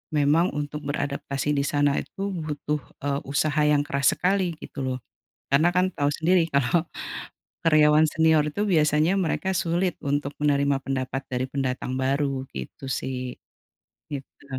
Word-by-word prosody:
memang 150 +4 +4
untuk 150 0 -3
beradaptasi 140 0 -2
di 140 -1 +1
sana 145 -1 +2
itu 195 +1 -5
butuh, 150 -3 -3 0.2
eee, 140 -1 0
usaha 150 +1 +1
yang 145 -1 +3
keras 140 -1 +2
sekali 185 -2 +1
gitu - - -8
loh, 130 - -1 0.5
karena 155 +5 +4
kan 180 +1 +2
tahu 145 0 +1
sendiri 165 +2 +2
kalau 140 +4 +2 0.8
karyawan 155 -1 +5
senior 160 -1 +3
itu 205 +8 -1
biasanya 155 -2 +3
mereka 185 +2 -1
sulit 180 -1 0
untuk 145 0 -1
menerima 140 -1 +2
pendapat 135 0 -2
dari 125 0 -1
pendatang 130 -1 -2
baru, 135 0 0
gitu 65 - -7
sih. 130 -1 -3 0.7
Gitu. 140 0 -8
145 Hz, 140 wpm, -25 LUFS, 140-160 Hz, 0.8 s, karyawan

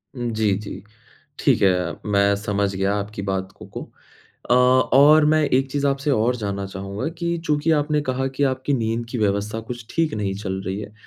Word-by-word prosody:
जी, 110 -4 0
जी। 105 -2 -8 0.6
ठीक 130 -6 +2
है, 90 -3 +2
मैं 100 -1 +3
समझ 100 -1 -1
गया 95 +1 0
आपकी 100 0 -4
बात 95 -1 -3
को - - -12
को। - - -7 0.7
अ, - - +6
और 130 +4 +5
मैं 155 +1 +3
एक 135 -1 +1
चीज़ 145 0 0
आपसे 140 +2 0
और 125 -1 +2
जानना 100 -3 -3
चाहूँगा 100 +5 -5
कि 170 0 -1
चूँकि 150 +1 +1
आपने 150 0 +1
कहा 130 -1 -1
कि 145 - 0
आपकी 130 +2 -2
नींद 115 -1 -1
की 125 - -3
व्यवस्था 105 +1 0
कुछ 120 +1 -8
ठीक 165 -2 0
नहीं 100 -2 -2
चल 95 -1 -4
रही 95 +1 -2
है, 105 - -8
110 Hz, 190 wpm, -22 LUFS, 100-135 Hz, 0.7 s, अ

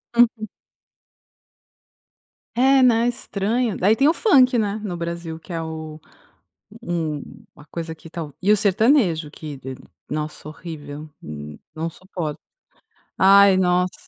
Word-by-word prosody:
Uhum. 230 -2 +3 2.1
É, 265 +1 +5
né, 235 -1 +4
estranho, 230 0 -1
daí 205 +5 +3
tem 275 +4 +3
o 320 - +5
funk, 255 - +4
né, 210 0 -1
no 180 -4 -3
Brasil 170 -1 -5
que 175 - -13
é 165 - -2
o 160 -1 -7 0.8
um 160 -4 -2 0.3
a 145 - -15
coisa 165 -1 -6
que 165 - -14
tal 155 -3 -6
e 195 +3 +1
o 210 - +7
sertanejo 195 - +2
que 150 -3 -8
de 130 0 -7 0.4
nossa 150 0 -4
horrível, 155 -2 -8 0.7
não 165 +1 -3
suporto. 170 -4 -6 0.8
Ai 195 0 +7
nossa, 180 0 +2
180 Hz, 130 wpm, -22 LUFS, 160-220 Hz, 2.1 s, o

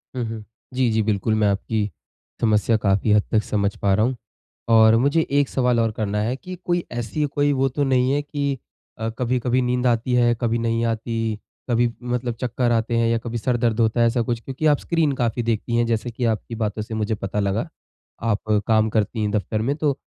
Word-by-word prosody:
हुँ, 125 - -1
हुँ। 110 -1 -6 0.3
जी, 125 -1 +2
जी 110 0 +2
बिल्कुल 105 0 0
मैं 105 -1 +2
आपकी 105 +1 -1 0.5
समस्या 110 0 +3
काफ़ी 100 0 +1
हद 105 -1 +5
तक 110 -1 +2
समझ 100 0 -1
पा 100 -1 +3
रहा 105 +3 +3
हूँ। 130 +1 -1 0.6
और 110 0 +7
मुझे 140 +7 +3
1 140 -1 +2
सवाल 125 -2 +1
और 115 -1 +2
करना 105 -1 -2
है 120 +4 -1
कि 185 +6 -8
कोई 175 -1 0
ऐसी 120 +5 -2
कोई 145 0 +2
वो 135 -1 +2
तो 140 +2 -1
नहीं 130 -1 +2
है 145 - +1
कि 140 -2 -2 0.4
अ, 110 0 -2
कभी-कभी 125 0 +1
नींद 125 0 0
आती 120 +1 +1
है, 120 -1 +4
कभी 115 -1 +1
नहीं 115 0 0
आती, 115 -1 -2 0.3
कभी 120 0 +2
मतलब 120 0 -2
चक्कर 120 -1 0
आते 115 +1 0
हैं 115 0 +2
या 115 0 +2
कभी 120 0 -4
सर 120 +2 0
दर्द 115 -1 0
होता 115 +1 +2
है 115 - +5
ऐसा 115 +1 +1
कुछ 115 0 -2
क्योंकि 135 +5 -4
आप 145 -2 +5
स्क्रीन 165 -4 +1
काफ़ी 120 +1 0
देखती 115 +1 -1
हैं, 120 0 +2
जैसे 115 +1 -1
कि 120 +2 -4
आपकी 110 +2 -8
बातों 110 -1 -2
से 110 +1 -6
मुझे 110 0 -1
पता 100 0 -3
लगा। 100 - -1 0.5
आप 110 -1 0
काम 110 -1 +3
करती 110 +1 0
हैं 105 - 0
दफ्तर 105 +1 -1
में 135 +5 0
तो 145 -3 0
115 Hz, 220 wpm, -22 LUFS, 110-125 Hz, 0.6 s, और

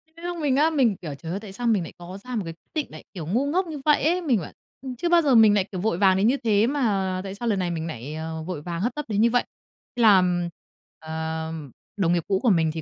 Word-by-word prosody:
Cái 335 +1 -10
lúc 350 0 -3
mình 290 -5 +1
á, 300 +3 +4
mình 260 -10 +2
kiểu: 155 -5 -7
"Trời 160 +4 -7
ơi, 190 - -2
tại 205 -2 -10
sao 240 +4 -3
mình 215 -6 +2
nại - - -9
có 175 +2 -9
ra 250 0 -5
một 220 - 0
cái 165 - -5
quyết 165 - -32
định 310 -3 -1
nại, - - -10
kiểu, 175 -6 -6
ngu 235 +11 +1
ngốc 355 +6 0
như 310 -3 -6
vậy 300 -3 +4
ấy?" 350 +3 +2
Mình 265 - +2
bảo, 155 - -8 0.3
ừm, 260 -1 -6
chưa 340 +8 -2
bao 345 0 +5
giờ 280 -5 +3
mình 220 -2 +7
nại, 205 -2 +3
kiểu, 185 -3 -4
vội 215 -4 0
vàng 190 -1 +4
đến 200 +3 +3
như 260 +4 +3
thế, 215 -1 +3
mà 200 -9 0
tại 195 0 -6
sao 235 +4 -4
lần 205 -4 +1
này 180 -2 -1
mình 165 -1 -3
nại, 145 -1 -6
à, 160 +1 -5
vội 175 -4 -5
vàng 170 +2 -4
hấp 240 +4 -1
tấp 295 - -4
đến 210 -2 0
như 235 - +5
vậy. 245 +1 +2 0.5
Làm, 180 -6 +4 0.5
ờ, 160 0 -4 0.5
đồng 175 -4 +2
nghiệp 170 -2 +1
cũ 190 -1 +1
của 245 - +4
mình 165 -5 +3
thì 160 - -4
200 Hz, 290 wpm, -24 LUFS, 175-255 Hz, 0.5 s, mình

